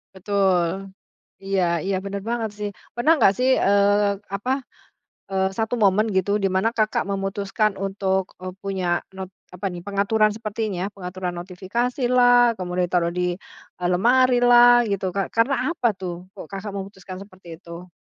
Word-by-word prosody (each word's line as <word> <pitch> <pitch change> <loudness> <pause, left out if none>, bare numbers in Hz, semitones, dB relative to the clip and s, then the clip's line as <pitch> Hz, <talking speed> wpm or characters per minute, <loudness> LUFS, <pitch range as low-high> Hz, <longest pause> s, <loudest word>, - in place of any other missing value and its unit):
Betul, 190 -1 0 0.5
iya 195 -1 0 0.2
iya, 195 0 0
bener 200 0 -4
banget 235 -2 -1
sih. 210 -1 -3 0.3
Pernah 240 +7 +3
enggak 200 -6 +5
sih, 255 +1 +2 0.2
eee, 200 0 +3
apa, 205 +6 -2 0.8
eee, 190 0 +2
1 225 +1 -1
momen 205 +2 +4
gitu 190 +1 +1
di - - +4
mana 190 +4 +2
Kakak 215 -2 0
memutuskan 200 +2 -1
untuk, 195 -1 0 0.2
eee, 185 0 -6
punya 195 -2 -3 0.3
not 190 -1 -6 0.3
apa 185 +3 -4
nih 175 - -7
pengaturan 205 +2 +2
sepertinya 215 -3 -3
pengaturan 180 -1 -5
notifikasilah 240 +6 +2
kemudian 180 -1 -2
taruh 170 -1 +1
di, 180 -1 0 0.4
eee, 175 - 0
lemarilah 245 +2 +5
gitu 200 -1 -2
ka - - +2 0.2
karena 230 +5 +3 0.2
apa 330 -8 -1
tuh 180 -2 -3 0.2
kok - - -8
Kakak 195 +1 -5
memutuskan 195 -1 -8
seperti 185 -3 -16
itu? 170 +1 -11
200 Hz, 145 wpm, -23 LUFS, 185-220 Hz, 0.8 s, enggak